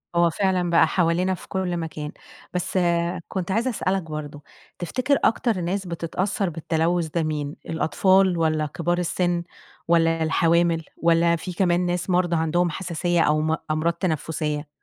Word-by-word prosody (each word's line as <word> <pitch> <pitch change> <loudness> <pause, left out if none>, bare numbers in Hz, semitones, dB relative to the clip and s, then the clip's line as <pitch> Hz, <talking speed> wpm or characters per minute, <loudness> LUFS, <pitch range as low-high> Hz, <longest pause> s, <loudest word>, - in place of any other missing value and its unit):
هو 170 0 +4
فعلًا 185 0 0
بقى 165 -1 +5
حوالينا 180 +2 +1
في 185 - -9
كل 185 -2 -2
مكان، 155 -2 -5 0.4
بس 180 +1 -2 0.5
كنت 190 -1 -3
عايزة 230 +6 +1
اسألك 195 -5 -1
برضه، 150 -2 -7 0.4
تفتكر 255 - 0
أكتر 225 -4 +2
ناس 190 +3 -2
بتتأثّر 180 +3 -2
بالتلوث 165 +1 0
ده 165 +1 -1
مين؟ 150 -1 -3
الأطفال، 185 +3 +3
والّا 155 -1 +1
كبار 170 +4 -1
السِن، 175 0 0 0.4
والّا 165 -1 +3
الحوامل، 165 +1 +2
والّا 170 0 +3
في 180 +2 -6
كمان 175 -1 +2
ناس 175 +1 -2
مرضى 175 -1 +2
عندهم 165 +2 +1
حساسية 175 0 -1
أو 155 -1 +3
م 160 +1 +1 0.2
أمراض 155 +2 +1
تنَفُّسية؟ 155 -3 -2
170 Hz, 145 wpm, -24 LUFS, 160-180 Hz, 0.5 s, بقى